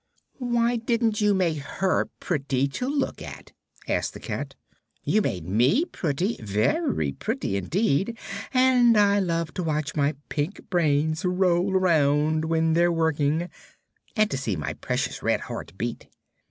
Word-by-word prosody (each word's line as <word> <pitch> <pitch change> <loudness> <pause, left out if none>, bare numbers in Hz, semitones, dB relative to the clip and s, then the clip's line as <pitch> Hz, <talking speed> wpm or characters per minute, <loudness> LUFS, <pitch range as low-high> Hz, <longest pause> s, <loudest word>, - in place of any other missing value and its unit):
"Why 240 -1 +1
didn't 230 -2 0
you 205 -1 +3
make 170 -5 +1
her 185 +7 -1
pretty 140 -4 0
to 250 - -3
look 280 -1 -1
at?" - - -9 0.4
asked - - -1
the - - -7
cat. - - -5 0.5
"You 215 - +2
made 90 - -3
me 125 - +3
pretty 180 - -2
very 110 - 0
pretty, 95 - -3
indeed 190 - 0 0.3
and 255 -3 +5
I 205 -1 +4
love 165 -3 -1
to - - -3
watch 155 -2 -1
my 145 0 +1
pink 150 +7 -3
brains 155 -2 +1
roll 180 0 +2
around 155 -3 +2
when 160 0 +1
they're 175 +1 +3
working, 160 0 +1 0.7
and 215 -1 +2
to - - -1
see 115 -8 -2
my 75 -4 -3
precious - - -3
red - - +1
heart - - -7
beat." 120 +3 -4
170 Hz, 145 wpm, -25 LUFS, 145-210 Hz, 0.7 s, and